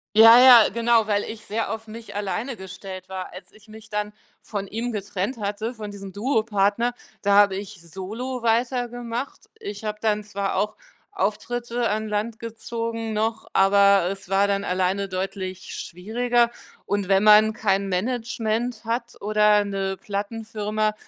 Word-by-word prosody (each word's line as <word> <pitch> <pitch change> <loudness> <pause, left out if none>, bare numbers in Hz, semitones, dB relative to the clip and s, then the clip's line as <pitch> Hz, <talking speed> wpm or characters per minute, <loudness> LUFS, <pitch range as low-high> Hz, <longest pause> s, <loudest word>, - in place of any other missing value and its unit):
Ja, 225 +2 +10
ja, 250 -3 +9
genau, 230 0 +2
weil 205 -1 +1
ich 220 -1 -7
sehr 220 +1 -2
auf 225 0 -5
mich 225 0 -10
alleine 210 +5 -3
gestellt 190 0 -9
war. 190 -1 -6
Als 185 - -11
ich 215 +1 -20
mich 220 0 -13
dann 210 0 -3 0.3
von 200 -2 -5
ihm 230 +4 -3
getrennt 205 +3 -3
hatte, 210 +3 -3
von 215 -3 -7
diesem 195 -1 -9
Duo-Partner, 220 0 +1 0.3
da 200 0 +2
habe 200 -1 +6
ich 195 -1 -7
solo 215 +9 -6
weitergemacht. 240 +1 -1 0.2
Ich 205 +1 -7
habe 210 0 -4
dann 210 -1 +1
zwar 200 -1 -3
auch 205 +2 0 0.4
Auftritte 240 - -2
an 215 +1 -1
Land 215 +2 -2
gezogen 230 0 -4
noch, 220 +1 -1
aber 200 -1 +5
es 195 -2 -8
war 195 +1 +3
dann 200 0 0
alleine 190 +1 0
deutlich 185 0 -4
schwieriger. 235 +6 0 0.3
Und 200 -1 -1
wenn 195 +1 +4
man 215 +1 +7
kein 200 -3 0
Management 225 +2 -2
hat 235 +1 -3
oder 210 0 +3
'ne 195 -1 -2
Plattenfirma, 215 +1 -2
210 Hz, 150 wpm, -24 LUFS, 200-230 Hz, 0.4 s, Ja